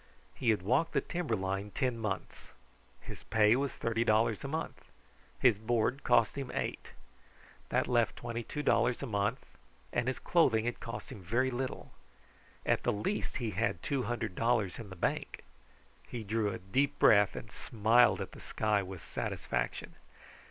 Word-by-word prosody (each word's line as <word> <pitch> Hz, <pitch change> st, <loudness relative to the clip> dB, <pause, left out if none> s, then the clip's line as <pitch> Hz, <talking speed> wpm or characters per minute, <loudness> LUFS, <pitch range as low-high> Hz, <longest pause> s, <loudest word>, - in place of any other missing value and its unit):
He 125 Hz, -, -1 dB
had 105 Hz, -4 st, +2 dB
walked 130 Hz, -, +2 dB
the 140 Hz, -, +2 dB
timber 170 Hz, -8 st, -2 dB
line 95 Hz, +1 st, -2 dB
ten 125 Hz, +3 st, -1 dB
months. 105 Hz, -4 st, -5 dB, 0.5 s
His -, -, -9 dB
pay 110 Hz, +1 st, +4 dB
was 135 Hz, 0 st, 0 dB
thirty 115 Hz, 0 st, 0 dB
dollars 110 Hz, -1 st, +2 dB
a -, -, -3 dB
month, 160 Hz, +3 st, -4 dB
and -, -, -28 dB, 0.5 s
his 120 Hz, -6 st, +5 dB
board 120 Hz, +4 st, 0 dB
cost 115 Hz, -, +3 dB
him 135 Hz, -2 st, -4 dB
eight. -, -, -4 dB, 0.8 s
That -, -, +1 dB
left 120 Hz, -3 st, +2 dB
twenty 120 Hz, 0 st, -4 dB
two 150 Hz, +6 st, -5 dB
dollars 120 Hz, +1 st, +2 dB
a -, -, -1 dB
month, 100 Hz, -4 st, -1 dB, 0.5 s
and 120 Hz, 0 st, 0 dB
his 130 Hz, -, 0 dB
clothing 120 Hz, -10 st, +3 dB
had 120 Hz, -, -2 dB
cost 115 Hz, -, -7 dB
him 100 Hz, -, -8 dB
very 120 Hz, +8 st, +1 dB
little. 130 Hz, +1 st, -4 dB, 0.7 s
At -, -, +2 dB
the -, -, +1 dB
least 105 Hz, -, -2 dB
he 120 Hz, -5 st, -2 dB
had 110 Hz, +5 st, -1 dB
two 140 Hz, -3 st, 0 dB
hundred 120 Hz, -5 st, -2 dB
dollars 115 Hz, -3 st, +1 dB
in 110 Hz, -3 st, -8 dB
the 95 Hz, -, -9 dB
bank. 85 Hz, -, -2 dB, 0.6 s
He 120 Hz, -2 st, -5 dB
drew 110 Hz, 0 st, 0 dB
a -, -, -4 dB
deep 135 Hz, +10 st, 0 dB
breath 100 Hz, -1 st, +5 dB
and -, -, -7 dB
smiled 110 Hz, -2 st, +3 dB
at -, -, -5 dB
the -, -, -12 dB
sky 105 Hz, -2 st, 0 dB
with 95 Hz, -2 st, -8 dB
satisfaction. -, -, -3 dB
115 Hz, 175 wpm, -32 LUFS, 105-125 Hz, 0.8 s, his